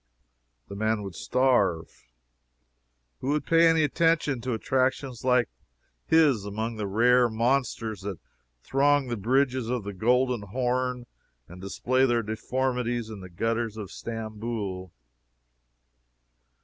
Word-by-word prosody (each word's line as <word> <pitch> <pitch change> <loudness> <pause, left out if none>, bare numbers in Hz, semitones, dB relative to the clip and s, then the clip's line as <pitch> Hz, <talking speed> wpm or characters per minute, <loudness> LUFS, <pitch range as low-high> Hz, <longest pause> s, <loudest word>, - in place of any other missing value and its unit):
The 100 - -8
man 110 0 0
would 95 -2 -7
starve. 100 - 0 1.1
Who - - -6
would 150 +1 0
pay 165 0 +5
any 165 -1 +4
attention 155 -3 +1
to 125 0 -2
attractions 130 +1 -1
like 125 -2 +3 0.6
his 150 -10 +4
among 110 +3 -4
the 105 -2 -3
rare 120 +4 +4
monsters 115 -3 -1
that 100 -2 -5 0.5
throng 140 0 +2
the 120 - -1
bridges 130 +2 +1
of 125 -3 -1
the 100 0 -6
Golden 125 +4 +1
Horn 125 +3 -2 0.4
and 90 +1 -12
display 130 +7 +1
their 120 -1 +1
deformities 120 +1 -2
in 105 - -8
the 95 -1 -10
gutters 115 +4 -2
of 100 -3 -7
Stamboul? 110 -5 -5
120 Hz, 125 wpm, -27 LUFS, 105-130 Hz, 1.1 s, pay